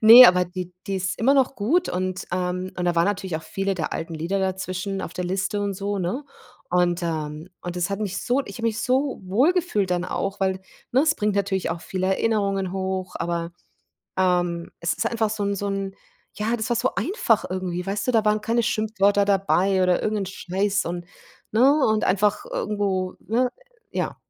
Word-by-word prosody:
ne, 230 +3 +11
aber 180 0 +5
die 180 0 -6
die 195 -1 -1
ist 185 0 -2
immer 270 +5 +4
noch 270 0 +3
gut 280 - +1
und 185 0 -2
ähm, 180 0 -2
und 180 - -1
da 175 - +2
waren 170 - +4
natürlich 190 -4 -1
auch 160 - -7
viele 195 +3 -2
der 165 -4 -3
alten 165 0 -4
Lieder 170 +5 -1
dazwischen 190 +1 -2
auf - - -6
der 180 - -3
Liste 195 +3 -1
und 200 -1 -1
so, 200 +1 -2
ne? 190 +11 -2 0.5
Und 175 0 +2
ähm, 155 0 -3
und 175 0 -5
das 175 +2 -1
hat 200 +1 -2
mich 200 -3 -2
so 255 +3 +2
ich - - -8
habe 230 - -8
mich 220 0 -3
so 265 +2 +1
wohl 230 - +3
gefühlt 320 - 0
dann 180 0 +1
auch, 195 +2 -3
weil, 190 -1 +1 0.3
ne, 260 - +5
es 315 0 +3
bringt 210 -5 0
natürlich 195 -1 0
auch 165 0 -4
viele 185 0 -2
Erinnerungen 195 -2 +1
hoch, 190 -1 -3
aber, 170 0 -2 0.6
ähm, 175 -2 +1
es 170 +1 0
ist - - -1
einfach 220 -2 0
so 215 -1 -3
'n 200 0 0
so 200 - -3
'n 195 -1 -3 0.4
ja, 220 +3 -1
das 220 +1 -3
war 240 - +2
so 250 +3 0
einfach 305 - +1
irgendwie, 180 -1 -3
weißt 200 +2 -2
du? - - +3
Da 225 -2 +3
waren 210 0 +3
keine 230 +2 +1
Schimpfwörter 210 -3 +2
dabei 195 -1 +2
oder 180 -1 +3
irgend 215 -1 0
'n - - -7
Scheiß 195 +1 -1
und, 175 0 -4 0.5
ne 270 +6 +4
und 215 -1 +2
einfach 205 +2 +2
irgendwo 195 -3 -1
ne, 245 +4 +1 0.4
ja. - - -2
195 Hz, 205 wpm, -24 LUFS, 180-215 Hz, 0.6 s, ne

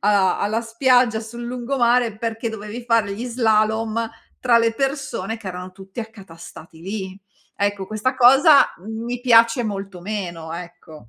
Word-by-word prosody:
a 200 -2 +2
alla 220 +3 0
spiaggia 235 0 +2
sul 235 +2 -9
lungomare, 240 -2 +1
perché 230 0 -3
dovevi 220 +2 -7
fare 225 -4 +2
gli 230 +5 -5
slalom 225 -1 +1 0.3
tra 240 -2 +4
le 230 0 +2
persone 270 -6 -2
che 200 -4 -7
erano 180 0 -7
tutti 195 +3 -14
accatastati 175 -7 -12
lì. 190 0 -6 0.4
Ecco, 200 -1 -1
questa 215 +5 -1
cosa 270 +4 +6
mi 235 +2 -5
piace 230 0 +5
molto 195 -3 -5
meno, 175 -5 -5
ecco. 165 -7 -10
220 Hz, 140 wpm, -21 LUFS, 195-235 Hz, 0.4 s, cosa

